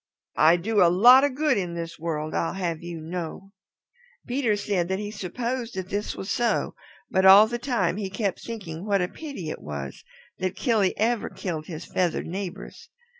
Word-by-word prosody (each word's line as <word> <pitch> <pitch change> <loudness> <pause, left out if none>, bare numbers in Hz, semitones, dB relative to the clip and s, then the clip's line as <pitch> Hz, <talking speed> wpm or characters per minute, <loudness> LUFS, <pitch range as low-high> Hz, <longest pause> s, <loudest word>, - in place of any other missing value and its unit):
I 160 +2 +7
do 210 +4 +1
a 175 - +7
lot 245 +9 +7
of 285 -2 +1
good 295 -6 +2
in 175 -2 -4
this 165 -1 -6
world, 155 -1 -3
I'd 165 - -1
have 170 -4 -2
you 170 -1 -6
know." 175 +4 -6 0.7
Peter 245 -4 +1
said 200 -4 -1
that 190 +1 -1
he 205 +1 -5
supposed 235 +5 -4
that 185 -1 -5
this 205 +2 -3
was 190 - -5
so, 235 -3 0 0.4
but 190 - +2
all 195 +3 +9
the 240 +2 -4
time 235 -9 0
he 200 -2 -3
kept 195 0 -2
thinking 190 -8 -6
what 200 -3 +2
a - - 0
pity 265 - -7
it - - -7
was 70 -2 -7 0.4
that 185 -1 -2
Killy 220 -7 +1
ever 230 +1 0
killed 160 -5 -5
his 165 -1 -7
feathered 180 -2 -1
neighbors. 190 +2 -7
190 Hz, 185 wpm, -25 LUFS, 170-225 Hz, 0.7 s, all